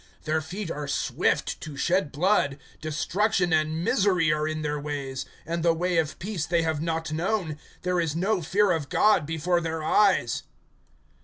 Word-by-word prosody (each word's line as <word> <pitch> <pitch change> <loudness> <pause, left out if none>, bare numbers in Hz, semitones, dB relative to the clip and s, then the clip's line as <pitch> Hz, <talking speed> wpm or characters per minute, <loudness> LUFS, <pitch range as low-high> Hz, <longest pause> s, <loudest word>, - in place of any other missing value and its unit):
(15)Their 155 0 +1
feet 185 +2 -5
are 150 -1 -4
swift 140 - 0
to 150 -3 -7
shed 170 +1 +1
blood. 155 -4 +2 0.2
(16)Destruction 180 +4 0
and 155 +1 +1
misery 180 -6 +3
are 155 0 -1
in 155 0 -3
their 150 0 -1
ways; 140 -3 -4 0.2
(17)and 170 +1 -2
the 165 0 +3
way 175 0 +1
of 155 -2 -1
peace 185 -4 -3
they 170 -1 +2
have 160 -2 -1
not 160 -1 -2
known. 165 -2 -1 0.2
(18)There 180 -1 +1
is 160 -2 -2
no 190 +3 +1
fear 195 +5 +2
of 160 -5 -1
God 185 -8 +3
before 170 +2 0
their 160 -1 -3
eyes. 185 - +3
165 Hz, 170 wpm, -26 LUFS, 155-180 Hz, 0.2 s, misery